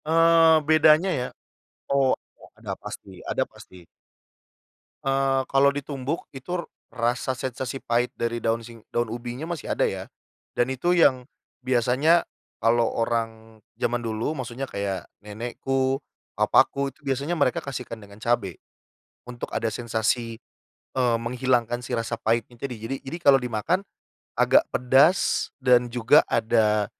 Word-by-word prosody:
Eee, 165 0 +6
bedanya 155 +3 +5
ya? 125 0 -2 0.6
Oh, 135 -1 +3 0.2
ada - - -16
ada - - -6
pasti - - -8
ada - - 0
pasti. 90 -2 -16 1.2
Eee, 135 0 +2
kalau 140 +1 +4
ditumbuk 140 +2 -4
itu 170 +7 -4 0.3
rasa 120 +2 0
sensasi 130 +1 -5
pahit 120 +1 0
dari 115 0 -2
daun 115 0 0
sing 115 -1 -13
daun 120 -1 0
ubinya 120 +6 -6
masih 170 -4 -3
ada - - +1
ya - - -5 0.5
dan 120 - +1
itu 130 +7 +1
yang 130 -8 +4 0.4
biasanya 130 +7 +3 0.4
kalau 115 +1 +3
orang 115 -1 -2 0.2
zaman 120 +1 +1
dulu 115 +7 -2
maksudnya 130 +1 -5
kayak 100 -2 -4 0.2
nenekku, 130 +5 -1 0.4
papaku 140 -1 +3
itu 155 - -30
biasanya 140 +3 -2
mereka 140 -7 +1
kasihkan 125 -4 -5
dengan 105 -1 -15
cabe 110 -7 -1 0.7
untuk 120 -1 -7
ada 115 0 0
sensasi, 115 0 -2 0.5
eee, 125 -3 +2
menghilangkan 120 0 0
si 125 - -8
rasa 115 -1 -1
pahitnya 115 +2 -1
itu. 140 - -3
Jadi 115 +5 -4
jadi 140 +5 -5
kalau 140 -5 +6
dimakan 125 - 0 0.5
agak - - +5
pedas 135 +8 +3
dan 125 -2 +3
juga 120 0 +5
ada 110 -2 +2
125 Hz, 135 wpm, -25 LUFS, 115-135 Hz, 1.2 s, Eee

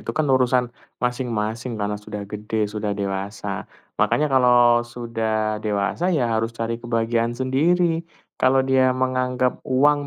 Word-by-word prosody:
Itu - - -4
kan 155 - +2
urusan 125 -1 +3 0.4
masing-masing 120 -1 -2
karena 105 0 -2
sudah 105 -1 -6
gede, 105 +1 -5 0.2
sudah 105 -1 -2
dewasa. 100 +1 -3 0.5
Makanya 150 - +2
kalau 120 -2 +5 0.2
sudah 110 -2 -1
dewasa 105 - -1
ya 145 - +1
harus 115 +1 0
cari 115 0 -2
kebahagiaan 115 0 0
sendiri. 165 +6 +1 0.3
Kalau 130 +1 +4
dia 130 -1 +4
menganggap 130 0 0
uang 145 +2 +3
120 Hz, 130 wpm, -22 LUFS, 110-130 Hz, 0.5 s, kalau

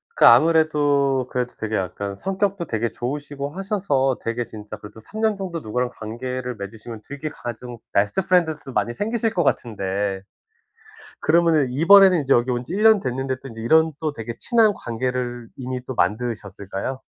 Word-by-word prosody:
그 - - +5
아무래도 145 -2 +4
그래도 125 -1 -2
되게 110 0 -3
약간 100 +1 -3
성격도 195 - -1
되게 115 -4 -2
좋으시고 140 +2 -4
하셔서 185 - 0
되게 115 +1 -1
진짜 105 -2 -9
그래도 105 +2 -12
3 210 - -9
년 220 -2 +2
정도 180 -4 -4
누구랑 125 +1 -2
관계를 125 +3 -5
맺으시면 110 +2 -8
되게 145 +2 -6
가장 120 -2 -7 0.2
베스트 100 - +2
프렌드들도 160 -7 +1
많이 120 - 0
생기실 225 - -1
것 175 - +1
같은데. 100 -6 -1 1.0
그러면은 160 -4 +3
이번에는 180 +4 +6
이제 135 0 +1
여기 120 +2 +2
온 120 0 -1
지 170 - -6
1 210 - -1
년 220 -1 +7
됐는데 130 -1 -2
또 - - -9
인제 115 -1 -9
이런 160 +7 +4
또 155 -2 -1
되게 115 -2 -6
친한 225 -3 +4
관계를 120 0 -3
이미 130 -1 -4
또 130 - -5
만드셨을까요? 105 +2 -2
130 Hz, 370 characters per minute, -22 LUFS, 115-160 Hz, 1.0 s, 년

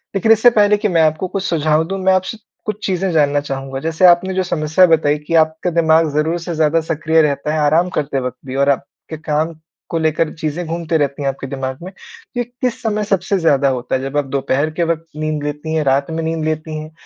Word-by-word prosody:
लेकिन 220 +3 +2
इससे 225 +2 +6
पहले 210 -2 +3
कि 210 - 0
मैं 170 -4 +2
आपको 155 +4 +1
कुछ 195 +1 -4
सुझाव 155 -2 +1
दूँ 195 0 -3
मैं 190 0 +4
आपसे 185 +4 -1 0.3
कुछ 210 0 -4
चीज़ें 190 -1 -1
जानना 145 -2 +2
चाहूँगा 135 -1 -5
जैसे 165 +4 +1
आपने 180 +2 +5
जो 185 0 0
समस्या 160 +1 +3
बताई 150 -2 +2
कि 165 - -3
आपका 160 +2 +2
दिमाग 160 -1 +3
ज़रूर 160 +3 0
से 170 -1 -5
ज़्यादा 160 +1 +2
सक्रिय 160 0 +1
रहता 150 +1 0
है, 155 - 0
आराम 160 +5 +2
करते 140 -2 -1
वक़्त 125 0 -4
भी 130 0 -6
और 140 +1 +2
आपके 140 +3 -4
काम 155 +1 -1 0.4
को 165 - -1
लेकर 155 0 0
चीज़ें 160 +2 -3
घूमते 165 0 -1
रहती 145 -1 -1
हैं 140 - -1
आपके 135 0 -6
दिमाग 130 -1 -4
में। 185 - -7 0.5
ये 245 - +1
किस 245 0 -4
समय 210 -1 0
सबसे 195 -1 0
ज़्यादा 140 -4 +3
होता 125 -1 -2
है 130 - -1
जब 135 +2 -4
आप 145 - +1
दोपहर 140 +3 0
के - - +3
वक़्त 165 0 -1
नींद 155 -1 -3
लेती 150 +2 -4
हैं, 155 - +1
रात 140 +3 +1
में 165 0 -3
नींद 160 -1 -2
लेती 155 0 -3
हैं 155 +1 -9
160 Hz, 230 wpm, -18 LUFS, 145-175 Hz, 0.5 s, इससे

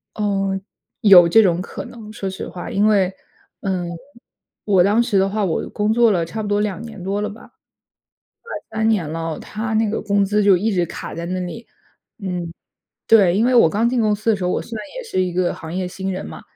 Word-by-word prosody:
嗯， 195 -2 -1 0.4
有 190 -6 +8
这 225 +7 +6
种 180 -3 +2
可 - - -7
能， 220 -3 -11
说 195 -2 -4
实 190 - -6
话。 175 - -7
因 205 +2 +1
为 195 -3 +3 0.5
嗯， 185 -3 -2 0.8
我 195 -4 +4
当 205 +5 +3
时 235 -4 +1
的 190 0 +3
话， 210 +2 -1
我 175 -5 -1
工 210 0 0
作 230 -1 +4
了 175 -3 +1
差 215 +7 -5
不 210 - -4
多 205 0 +1
2 210 -1 -2
年 220 -4 -9
多 195 +2 -1
了 210 - -2
吧， 215 +2 -12 0.9
快 475 - -12 0.3
3 220 - +2
年 200 -8 +1
了， 165 0 -4
它 220 +1 -4
那 220 0 +2
个 220 - -2
工 200 -1 +1
资 210 +1 +1
就 200 -2 +6
一 215 +5 0
直 175 -3 +1
卡 - - -7
在 170 +1 -5
那 185 +1 -3
里。 180 +7 -7 0.5
嗯， 180 -4 -4 0.6
对， 195 -5 +5
因 220 - +3
为 255 +1 +2
我 230 -9 +6
刚 215 +7 +1
进 245 0 0
公 215 -2 +2
司 215 +2 0
的 215 - +2
时 185 - -4
候， 180 - +1
我 - - -1
虽 230 - -7
然 215 - -6
也 - - -4
是 455 - -2
一 180 -1 0
个 180 0 0
行 160 0 -8
业 185 -1 -2
新 190 +1 -4
人 185 - -5
嘛。 - - -9
200 Hz, 245 characters per minute, -20 LUFS, 185-220 Hz, 0.9 s, 有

